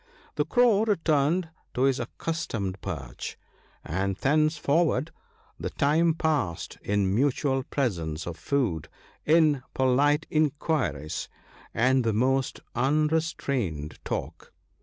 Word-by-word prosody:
The 150 - 0
Crow 220 +3 +4
returned 165 -3 +1 0.3
to 125 - +1
his 135 0 +3
accustomed 110 - -3
perch: 70 -10 -6 0.2
— - - -33 0.2
and 95 +4 -1
thenceforward 155 0 +2 0.5
the - - -3
time 160 +3 +2
passed 150 - -1
in 100 -2 +1
mutual 135 +2 +1
presents 85 - -2
of 85 - -5
food, 90 - -1 0.4
in 155 -3 +4
polite 145 +4 +3
inquiries, 145 - 0 0.4
and 130 +2 +3
the 115 -1 +1
most 130 +4 +1
unrestrained 135 - 0
talk. - - -5
135 Hz, 105 wpm, -27 LUFS, 100-155 Hz, 0.5 s, Crow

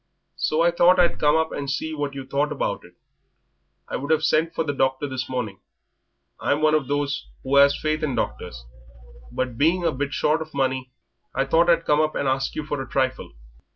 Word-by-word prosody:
So 155 +2 +1
I 170 - +4
thought 175 +2 +4
I'd 175 -1 +3
come 150 0 +4
up 160 0 +1
and 140 -1 -4
see 160 +3 -2
what 145 -2 -3
you 135 -1 -6
thought 140 +3 -1
about 150 - -2
it. - - -17 0.9
I - - -3
would 145 +3 -4
'ave 155 0 +2
sent 160 +1 +1
for - - 0
the 145 -2 -2
doctor 130 +1 0
this 130 -1 -4
morning 110 -7 -4 0.8
I'm 145 - 0
one 155 0 +4
of 150 -4 +1
those 145 0 -2 0.2
who 140 +1 +3
'as 140 0 +5
faith 155 0 -1
in 145 -5 -1
doctors - - -4 0.7
but 125 -3 -3
being 170 +5 +3
a 165 - +2
bit 140 0 -3
short 155 +3 +1
of 155 -2 -8
money 130 -1 -1 0.5
I 135 - +1
thought 165 +5 +3
I'd 165 -1 +3
come 150 +1 +3
up 155 0 0
and 140 - -1
ask 135 +1 -1
you 155 - -3
for 145 -2 -3
a 130 - -8
trifle." 130 -1 -1
145 Hz, 215 wpm, -23 LUFS, 135-155 Hz, 0.9 s, as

